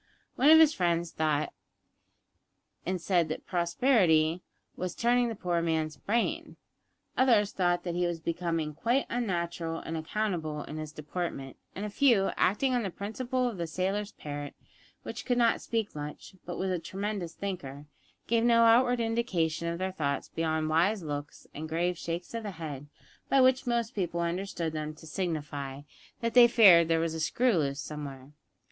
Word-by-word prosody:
One 275 +4 +4
of 320 - +10
his 315 -1 +6
friends 170 -2 0
thought 155 -1 0 1.3
and 185 0 -1
said 175 -2 +1
that 155 - -5
prosperity 170 - +2 0.3
was 180 -1 -4
turning 240 0 +2
the 225 - -4
poor 175 -3 -1
man's 160 -2 -1
brain. 235 - -1 0.6
Others 225 -6 +4
thought 175 -2 +1
that 175 - -3
he 175 0 +1
was 170 -1 -3
becoming 165 -2 -2
quite 240 - +1
unnatural 170 -7 -2
and 165 - -5
unaccountable 160 -3 -2
in 155 - -7
his 155 -1 -5
deportment; 150 -3 -5 0.2
and 200 - -4
a - - -3
few, 225 -5 +3
acting 255 +8 +2
on 245 - +2
the 200 - -2
principle 245 +7 -2
of 230 -5 -4
the 170 - -2
sailor's 195 +5 -2
parrot, 145 -1 -7 0.5
which - - -6
"could 245 -2 0
not 235 -1 +3
speak 225 -3 -2
much, 150 +3 -7
but 175 - -4
was 190 0 -1
a 180 - 0
tremendous 190 0 -4
thinker," 150 -8 -5 0.4
gave 230 0 +2
no 230 -1 +5
outward 245 +2 +5
indication 190 -9 0
of 170 0 -2
their 190 +1 -2
thoughts 140 -6 -2
beyond 160 -1 -1
wise 175 +6 +2
looks 145 -1 -6
and 155 +2 -6
grave 175 +3 0
shakes 170 +3 -5
of 230 - -3
the 215 - -5
head, 155 -6 -7 0.4
by 275 - +4
which 255 0 +4
most 235 0 0
people 175 -3 -2
understood 170 -1 -2
them 155 0 -4
to 160 - -14
signify 150 -5 -4 0.4
that 230 -1 -1
they 245 0 +9
feared 190 -9 +7
there 165 0 +2
was 165 0 -1
a 160 - -4
screw 235 +8 +2
loose 140 -4 0
somewhere. 140 -3 -7
175 Hz, 170 wpm, -29 LUFS, 160-225 Hz, 1.3 s, of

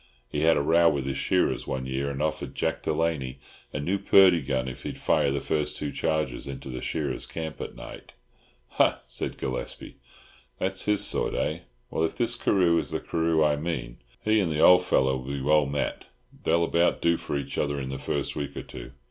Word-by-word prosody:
He 75 - -3
had 80 +1 +4
a - - +1
row 85 +2 +5
with 70 -2 -1
his 70 0 -2
shearers 90 +6 +1
one 65 -1 -3
year, 65 +2 -2
and 70 +1 -3
offered 80 -1 -3
Jack - - -1
Delaney 75 -6 -1 0.3
a - - -3
new 95 +7 -1
Purdey 95 -4 +6
gun 65 -1 -1
if 65 - -7
he'd - - -6
fire 70 - +2
the 70 +1 0
first 75 +2 -1
two 75 -1 -3
charges 75 -6 -1
into 70 0 -7
the 65 -1 -5
shearers' 70 -6 -3
camp 80 -2 -6
at - - -6
night." - - -10 0.7
"Ha!" - - +4
said - - -4
Gillespie. 65 - -5 0.6
"That's 95 0 -1
his 105 -1 +3
sort, - - 0
eh? - - -1 0.3
Well, 80 - 0
if 80 - -1
this 120 -1 +1
Carew 90 -7 +3
is - - -3
the - - -1
Carew 80 -1 +1
I 75 -1 +2
mean, 70 -7 -4 0.3
he 110 0 +4
and 90 -5 0
the 75 - -1
old 90 +2 +7
fellow 65 -6 +2
will 65 +2 -6
be 70 - -3
well 75 +1 +3
met. 70 +1 -2 0.4
They'll 85 0 +3
about 85 +1 +2
do 85 0 +4
for 70 - -3
each 70 - -4
other 70 -1 0
in 65 -1 -4
the 65 - -4
first 70 - -2
week 70 -2 -4
or - - -4
two." 65 +2 -10
75 Hz, 210 wpm, -27 LUFS, 70-85 Hz, 0.7 s, old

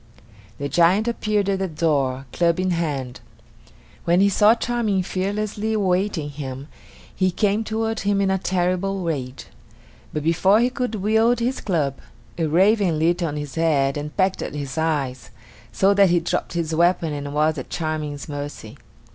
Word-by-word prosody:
The 140 - -3
giant 175 +8 +3
appeared 215 -3 0
at 195 -1 0
the 190 - -1
door, 140 -5 0
club 170 0 +2
in 185 0 0
hand. 145 -7 -2 0.8
When 175 +1 +3
he 200 +1 +5
saw 210 +3 +5
Charming 230 -5 0
fearlessly 205 +3 -2
awaiting 185 -6 0
him, 135 0 -7 0.5
he 185 0 +2
came 205 +3 0
toward 225 0 -2
him 200 0 +1
in 195 -1 +2
a 190 - +1
terrible 185 +1 -1
rage. 135 -6 -4 0.7
But 150 - -3
before 185 +6 +3
he 245 +2 +2
could 250 -3 -2
wield 220 +4 +2
his 250 +3 -1
club, 150 -8 -1 0.4
a 165 - +1
raven 190 +1 +3
lit 170 +3 +1
on 155 -3 -2
his 145 -2 -6
head 150 -5 +1
and 150 0 -6
pecked 190 -1 +1
at - - -5
his 140 -2 -5
eyes, 140 -9 -2 0.4
so 195 +1 +3
that 200 -1 +5
he 175 0 +3
dropped 170 - -2
his 165 -2 -2
weapon 170 -1 +2
and 145 -1 -5
was 155 0 +2
at 130 - -8
Charming's 155 -3 -4
mercy. 145 -7 -7
175 Hz, 165 wpm, -22 LUFS, 150-200 Hz, 0.8 s, he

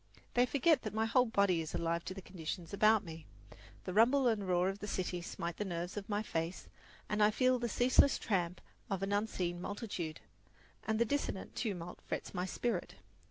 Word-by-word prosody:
They 245 +1 +4
forget 280 +2 +3
that 215 -1 -5
my 220 0 +2
whole 250 +2 +3
body 200 -6 +3
is 160 - -5
alive 170 0 0
to 185 - -5
the 195 - -8
conditions 170 -1 -6
about 215 +1 +4
me. 160 -2 -9 0.6
The 185 - -4
rumble 250 +6 +5
and 210 -4 +1
roar 180 0 +3
of 195 +1 -2
the 210 - -5
city 180 -3 -2
smite 170 0 -5
the - - -1
nerves 175 -2 -4
of 205 0 -6
my 205 0 0
face, 165 -2 -3 0.4
and 210 0 0
I 210 - +7
feel 255 +3 +3
the 240 0 -1
ceaseless 255 +4 +4
tramp 180 -4 -1 0.3
of 195 -1 -1
an 195 +1 0
unseen 185 -4 -1
multitude, 190 -6 -4 0.7
and 220 0 +1
the 235 - +3
dissonant 280 -6 -2
tumult 180 -6 -4
frets - - -5
my 180 +1 -2
spirit. 240 +5 -2
200 Hz, 195 wpm, -34 LUFS, 175-225 Hz, 0.7 s, I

